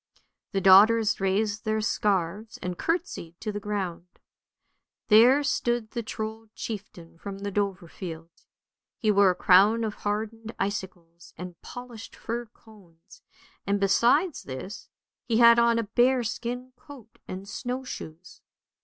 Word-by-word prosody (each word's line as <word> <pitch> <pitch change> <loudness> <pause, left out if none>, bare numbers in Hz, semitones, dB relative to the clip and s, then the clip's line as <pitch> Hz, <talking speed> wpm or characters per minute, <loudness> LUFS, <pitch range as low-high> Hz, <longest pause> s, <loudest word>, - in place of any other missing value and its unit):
The 195 - -1
daughters 210 +4 +6
raised 205 +2 0
their 215 0 0
scarves 205 0 -1
and 180 0 -3
curtseyed 325 - -3
to 215 - -3
the 205 - -4
ground. 190 -4 -4 1.0
There 245 +7 +6
stood 240 -5 -1
the 240 - -3
Trold 220 0 -6
chieftain 185 -6 -8
from 200 +1 -7
the 200 +1 -5
Dovrefield; 180 -4 -4 0.7
he 215 - +2
wore 200 -1 +5
a 180 - +1
crown 200 +5 +5
of 215 -1 -2
hardened 220 +2 -4
icicles 185 -4 -5
and 180 0 -9
polished 245 -3 -10
fir 235 +1 -5
cones, 200 -7 -20 0.5
and 200 0 +1
besides 240 - +3
this, 130 +10 -8 0.4
he 225 - +1
had 235 0 +7
on 235 0 +4
a 230 - +1
bearskin 245 +2 0
coat 255 -5 -15
and 190 +2 -7
snow 250 +5 -4
shoes. 170 -8 -9
210 Hz, 130 wpm, -26 LUFS, 190-235 Hz, 1.0 s, had